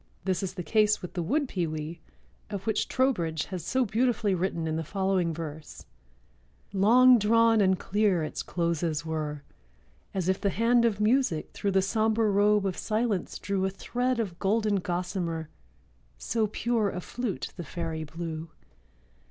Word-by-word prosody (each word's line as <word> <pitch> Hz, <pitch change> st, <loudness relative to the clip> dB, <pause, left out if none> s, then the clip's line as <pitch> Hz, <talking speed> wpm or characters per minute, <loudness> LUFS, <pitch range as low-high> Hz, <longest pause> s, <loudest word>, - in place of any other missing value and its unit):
This 185 Hz, -2 st, 0 dB
is 190 Hz, -2 st, -4 dB
the 180 Hz, -, -4 dB
case 210 Hz, +5 st, +2 dB
with 180 Hz, -, -7 dB
the 180 Hz, -, -2 dB
wood 280 Hz, -, 0 dB
pewee, 165 Hz, -4 st, -3 dB, 0.5 s
of 200 Hz, -2 st, -5 dB
which 220 Hz, -1 st, 0 dB
Trowbridge 170 Hz, -, 0 dB
has 185 Hz, -3 st, -6 dB
so 260 Hz, -1 st, +1 dB
beautifully 220 Hz, -2 st, +1 dB
written 175 Hz, -2 st, -1 dB
in 160 Hz, 0 st, -1 dB
the 160 Hz, -, -2 dB
following 190 Hz, -1 st, 0 dB
verse: 155 Hz, -1 st, -7 dB, 0.9 s
"Long 240 Hz, +5 st, +6 dB
drawn 225 Hz, +1 st, +4 dB
and 190 Hz, -1 st, +3 dB
clear 200 Hz, -4 st, +1 dB
its 155 Hz, -, -4 dB
closes 170 Hz, -3 st, -1 dB
were— 150 Hz, -2 st, -3 dB, 0.7 s
As 185 Hz, -3 st, -2 dB
if 190 Hz, +1 st, +1 dB
the 200 Hz, -, +2 dB
hand 235 Hz, +3 st, +3 dB
of 215 Hz, -3 st, +1 dB
Music 215 Hz, -, +1 dB
through 200 Hz, -1 st, -1 dB
The 190 Hz, 0 st, +3 dB
sombre 220 Hz, +1 st, +2 dB
robe 205 Hz, 0 st, +3 dB
of 190 Hz, -2 st, -2 dB
Silence 215 Hz, -3 st, -1 dB
drew 200 Hz, -1 st, -2 dB
A 190 Hz, -, +2 dB
thread 245 Hz, +5 st, -2 dB
of 190 Hz, -6 st, -3 dB
golden 210 Hz, +1 st, +1 dB
gossamer; 175 Hz, -3 st, -3 dB, 0.7 s
So 220 Hz, -, 0 dB
pure 225 Hz, 0 st, 0 dB
a 180 Hz, -, -4 dB
flute 235 Hz, +3 st, -4 dB
the 175 Hz, -, -6 dB
fairy 165 Hz, -1 st, -4 dB
blew. 160 Hz, +1 st, -6 dB
195 Hz, 160 wpm, -28 LUFS, 170-220 Hz, 0.9 s, Long